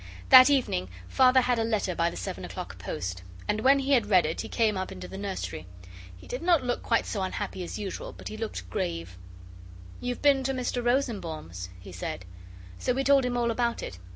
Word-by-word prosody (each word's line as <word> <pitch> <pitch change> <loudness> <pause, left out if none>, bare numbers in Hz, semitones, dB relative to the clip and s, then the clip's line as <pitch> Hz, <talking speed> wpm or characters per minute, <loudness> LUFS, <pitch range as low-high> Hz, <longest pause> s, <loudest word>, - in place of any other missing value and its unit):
That 260 0 +10
evening 240 - +1 0.2
Father 260 - +5
had 245 -1 +1
a - - +2
letter 215 -5 0
by 170 0 +1
the - - -8
seven - - -5
o'clock - - -7
post. 90 +1 -4 0.3
And 215 +1 0
when 270 +4 +6
he 275 0 -1
had 240 -6 +4
read 185 -5 +5
it 160 - -2
he - - -7
came 220 -3 +2
up 185 0 -3
into - - -8
the - - -9
nursery. 190 - -5 0.5
He 90 - -14
did 250 - -5
not 340 -4 +3
look 245 -1 -1
quite 230 - +1
so 205 - -3
unhappy 185 0 -3
as 175 - -6
usual, 200 -3 -5
but - - -10
he - - -6
looked 215 - -5
grave. 85 +1 -3 0.8
'You've 245 0 -4
been 280 -2 +5
to 270 - 0
Mr 250 -1 -2
Rosenbaum's,' 175 - -2
he 95 +1 -11
said. 90 0 -5 0.5
So 250 - 0
we 270 - 0
told 275 -1 +4
him 245 -1 -1
all 235 -1 +1
about 235 0 -1
it. 90 - -7
225 Hz, 210 wpm, -28 LUFS, 170-255 Hz, 0.8 s, That